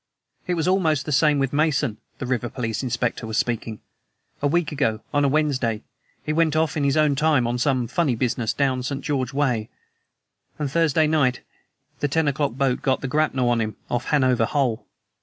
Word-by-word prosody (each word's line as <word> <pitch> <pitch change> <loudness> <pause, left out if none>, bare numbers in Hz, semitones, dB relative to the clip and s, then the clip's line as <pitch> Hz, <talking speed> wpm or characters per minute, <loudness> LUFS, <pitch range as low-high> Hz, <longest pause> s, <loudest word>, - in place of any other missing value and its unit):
"It 180 - 0
was 165 0 -1
almost 160 -7 +2
the 150 - -4
same 150 +1 +4
with 135 -1 -1
Mason." 145 -6 +1 0.2
The - - -5
river 125 -1 -1
police 115 -3 -3
inspector 120 -2 -2
was 110 0 -3
speaking. 115 -2 -2 0.6
"A 145 - +2
week 170 +3 +1
ago, 115 -7 0
on 145 0 +2
a - - +4
Wednesday, 135 -7 0 0.4
he 155 - -1
went 160 -1 +2
off 160 0 +1
in 150 - 0
his 140 +1 +2
own 150 -2 +4
time 145 -3 +2
on 120 +1 -1
some 130 -1 +1
funny 145 -1 0
business 115 -1 -1
down 130 -2 0
St. 135 +2 -3
George's 130 -4 -1
way 125 -7 0 0.9
and 145 -3 -3
Thursday 160 0 +3
night 145 -5 +1 0.6
the 145 - +1
ten 160 +2 +1
o'clock 140 -2 0
boat 135 -1 0
got 130 -1 0
the 135 - -3
grapnel 135 -3 +1
on 120 -1 +2
him 110 -1 -3 0.2
off 120 +1 -1
Hanover 130 -5 +2
Hole. 125 -4 -1
135 Hz, 195 wpm, -23 LUFS, 125-150 Hz, 0.9 s, same